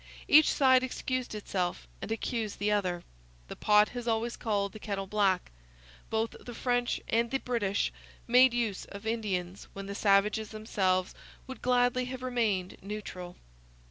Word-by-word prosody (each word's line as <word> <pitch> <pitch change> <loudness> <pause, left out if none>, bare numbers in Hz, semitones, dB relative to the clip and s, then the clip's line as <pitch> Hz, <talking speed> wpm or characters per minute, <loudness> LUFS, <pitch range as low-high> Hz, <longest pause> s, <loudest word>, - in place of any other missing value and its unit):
Each 310 +1 +7
side 260 -3 +5
excused 255 -2 -3
itself 185 -4 -3
and - - -5
accused 225 -1 -2
the 205 +1 0
other. 180 -4 0 0.5
The - - -6
pot 210 0 +4
has 245 -1 -6
always 230 +1 0
called 200 -3 -1
the 215 - -9
kettle 200 -2 -3
black. 195 -2 +1 0.6
Both 225 +1 0
the 240 - -8
French 245 0 0
and 230 +1 +1
the 270 - +1
British 225 -7 -1 0.3
made 250 +2 +6
use 230 -5 -1
of 200 +2 -10
Indians 195 -5 -2
when 195 0 -7
the 200 - -5
savages 210 +1 +2
themselves 190 -4 0 0.3
would 260 - -9
gladly 250 0 +2
have 255 0 -6
remained 220 -8 0
neutral. 185 -3 -7
215 Hz, 150 wpm, -30 LUFS, 200-245 Hz, 0.6 s, Each